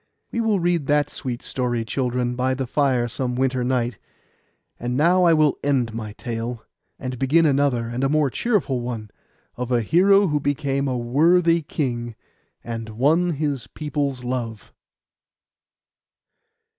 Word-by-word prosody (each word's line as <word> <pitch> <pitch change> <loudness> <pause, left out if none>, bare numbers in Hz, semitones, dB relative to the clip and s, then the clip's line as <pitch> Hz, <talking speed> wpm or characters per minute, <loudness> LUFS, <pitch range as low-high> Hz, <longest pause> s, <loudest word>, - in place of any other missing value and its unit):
We 235 - -1
will 220 -3 +2
read 170 -4 0
that 145 -1 +2
sweet 125 -3 -5
story, 120 -3 -2
children, 125 0 -1
by 130 +1 0
the 135 0 -2
fire 130 -2 +1
some 125 +1 -3
winter 130 0 0
night. 120 -3 -1 0.8
And 120 +1 -2
now 175 +4 +4
I 170 - +6
will 155 -2 +2
end 130 -5 +1
my 110 -2 -5
tale, 115 0 -5 0.3
and 130 -2 -5
begin 155 +5 +3
another 135 -5 +2
and 120 +3 -3
a 135 - +2
more 150 -2 +2
cheerful 180 - 0
one, 115 -4 -5 0.5
of 125 0 -4
a 120 -2 +2
hero 195 - +5
who 150 -2 +1
became 140 -1 -1
a 130 -1 -1
worthy 165 +8 +3
king, 120 -7 -3 0.5
and 115 -1 -5
won 155 +10 +2
his 145 -4 -2
people's 145 -4 -3
love. 120 -5 -4
130 Hz, 145 wpm, -23 LUFS, 120-150 Hz, 0.8 s, I